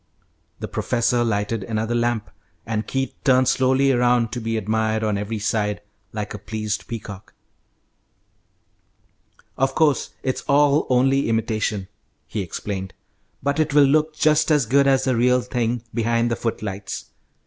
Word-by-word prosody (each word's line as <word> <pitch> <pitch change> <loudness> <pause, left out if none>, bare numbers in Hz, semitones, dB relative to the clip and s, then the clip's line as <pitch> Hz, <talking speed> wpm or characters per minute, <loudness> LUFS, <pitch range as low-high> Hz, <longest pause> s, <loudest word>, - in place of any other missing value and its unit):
The - - -4
professor 120 0 0
lighted 105 -1 -1
another 110 +2 -2
lamp, 120 -2 -1 0.3
and 110 -2 -2
Keith 135 0 -2
turned 130 -2 +4
slowly 130 +1 +3
around, 120 -2 +2
to 120 - -4
be 115 0 -2
admired 110 +1 0
on 105 -1 +1
every 105 +2 -3
side 105 -1 -1 0.3
like 105 -1 -5
a 105 - -6
pleased 110 -1 -4
peacock. 105 -3 -8 2.2
"Of 135 0 +1
course 150 -3 +1
it's 130 - -1
all 145 +1 +4
only 135 +1 +3
imitation," 110 -3 -1 0.4
he 105 - -4
explained, 95 +1 -5 0.5
"but 140 +2 0
it 155 -2 0
will 145 - +8
look 155 +2 +2
just 155 +1 +3
as 150 -5 +3
good 140 +4 +3
as 135 -1 +3
the 130 -1 +1
real 125 +2 +3
thing 120 -1 -2
behind 115 0 +1
the - - +1
footlights. 100 -4 -5
115 Hz, 145 wpm, -22 LUFS, 110-135 Hz, 2.2 s, will